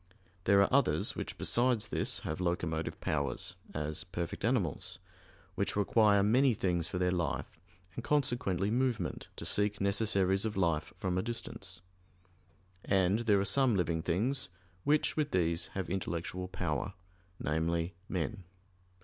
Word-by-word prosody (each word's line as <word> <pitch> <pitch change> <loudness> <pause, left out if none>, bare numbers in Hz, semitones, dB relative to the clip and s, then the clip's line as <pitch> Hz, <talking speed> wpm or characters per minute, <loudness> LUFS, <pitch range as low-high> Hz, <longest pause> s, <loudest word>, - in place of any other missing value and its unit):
There 100 +1 +5
are - - -1
others - - +2
which - - -5
besides 120 -2 +2
this - - 0
have 80 +3 -4
locomotive 85 -2 -1
powers, 70 -4 -1 0.2
as 75 +1 -3
perfect 85 0 -5
animals, 110 - 0 0.6
which - - -1
require 105 0 +4
many 125 +4 +4
things 90 -4 0
for - - -4
their 90 0 +2
life, 85 -2 -2 0.3
and - - -6
consequently 120 -9 +1
movement 120 - -1
to - - -7
seek 105 0 +2
necessaries 100 -1 +2
of 110 -2 -2
life 85 -5 +1
from 90 -1 -1
a - - +2
distance. 115 +3 -6 1.0
And 95 +1 +2
there 105 -4 +3
are 100 - 0
some 130 -1 +3
living 85 -3 0
things 115 +12 0 0.4
which 150 +1 +2
with 150 -2 0
these 85 - +1
have 95 -3 -2
intellectual 90 0 -3
power 90 0 -2 0.5
namely, 85 +3 -1 0.2
men. 95 +2 -3
95 Hz, 140 wpm, -32 LUFS, 85-110 Hz, 1.0 s, There